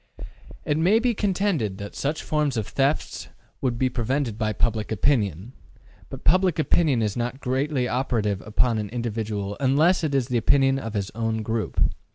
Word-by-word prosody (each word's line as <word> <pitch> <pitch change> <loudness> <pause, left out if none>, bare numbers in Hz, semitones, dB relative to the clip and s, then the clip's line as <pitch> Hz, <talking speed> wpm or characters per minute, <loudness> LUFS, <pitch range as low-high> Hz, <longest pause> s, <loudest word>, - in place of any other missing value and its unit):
It 150 +1 0
may 185 +7 +4
be 240 +1 +2
contended 190 - 0
that 100 0 -7
such 150 +3 -2
forms 150 -4 0
of 110 - -1
theft 140 +2 -1 0.3
would 125 -3 0
be 130 - +2
prevented 125 0 -1
by 110 -1 -1
public 110 +1 -1
opinion. 105 - 0 0.6
But 135 - -9
public 185 +1 +3
opinion 150 -6 +2
is 105 -2 -1
not 125 +2 -3
greatly 130 0 0
operative 115 -6 -1
upon 110 +1 +1
an 105 -1 -4
individual 110 -4 -3
unless 155 +7 +3
it 145 -3 0
is 130 -3 +1
the 125 - +1
opinion 135 +3 +3
of 115 -4 -6
his 100 -1 -2
own 115 -1 -2
group. 110 0 -2
125 Hz, 170 wpm, -24 LUFS, 110-145 Hz, 0.6 s, may